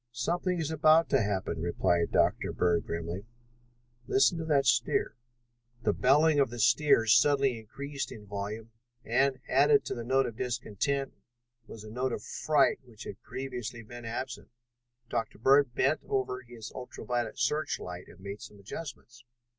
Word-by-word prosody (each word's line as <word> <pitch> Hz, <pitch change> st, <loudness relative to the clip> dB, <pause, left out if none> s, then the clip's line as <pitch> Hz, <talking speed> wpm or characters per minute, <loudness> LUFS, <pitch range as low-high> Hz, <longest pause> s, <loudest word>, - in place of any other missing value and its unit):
"Something 175 Hz, +9 st, -1 dB
is 160 Hz, -1 st, -2 dB
about 160 Hz, +1 st, +5 dB
to 135 Hz, -3 st, +3 dB
happen," 95 Hz, -5 st, -2 dB
replied 85 Hz, 0 st, +1 dB
Dr. -, -, +2 dB
Bird 85 Hz, -1 st, +1 dB
grimly. 85 Hz, +5 st, -4 dB, 0.8 s
"Listen 135 Hz, +5 st, +3 dB
to 160 Hz, -, -3 dB
that 145 Hz, -3 st, +2 dB
steer." 115 Hz, -1 st, +2 dB, 0.7 s
The -, -, +2 dB
bellowing 145 Hz, +4 st, +4 dB
of 135 Hz, -3 st, +3 dB
the 120 Hz, -, -7 dB
steer 130 Hz, +4 st, +4 dB
had 115 Hz, -, -3 dB
suddenly 135 Hz, -1 st, +4 dB
increased 140 Hz, +6 st, -6 dB
in 110 Hz, -4 st, -10 dB
volume 105 Hz, +3 st, -5 dB, 0.3 s
and, 130 Hz, +3 st, +2 dB
added 430 Hz, -2 st, +4 dB
to -, -, -3 dB
the 120 Hz, -, -5 dB
note 135 Hz, +3 st, +2 dB
of 110 Hz, -, -6 dB
discontent, 125 Hz, +3 st, -2 dB, 0.5 s
was 110 Hz, -, -10 dB
a 110 Hz, -, -10 dB
note 125 Hz, +2 st, -1 dB
of -, -, -5 dB
fright 150 Hz, -3 st, +2 dB
which 120 Hz, -4 st, -13 dB
had 100 Hz, -, -8 dB
previously 125 Hz, -3 st, -6 dB
been 120 Hz, +1 st, -10 dB
absent. 120 Hz, +2 st, -5 dB, 0.6 s
Dr. 115 Hz, -1 st, -3 dB
Bird 135 Hz, +1 st, +4 dB
bent 140 Hz, +4 st, +2 dB
over 130 Hz, -1 st, -1 dB
his 115 Hz, -3 st, -10 dB
ultra 125 Hz, -1 st, -8 dB
violet 120 Hz, -1 st, -2 dB
search 155 Hz, +1 st, 0 dB
light 90 Hz, 0 st, -8 dB
and -, -, -16 dB
made 100 Hz, +2 st, -7 dB
some 115 Hz, -3 st, -11 dB
adjustments. 120 Hz, +1 st, -9 dB
120 Hz, 160 wpm, -30 LUFS, 110-140 Hz, 0.8 s, about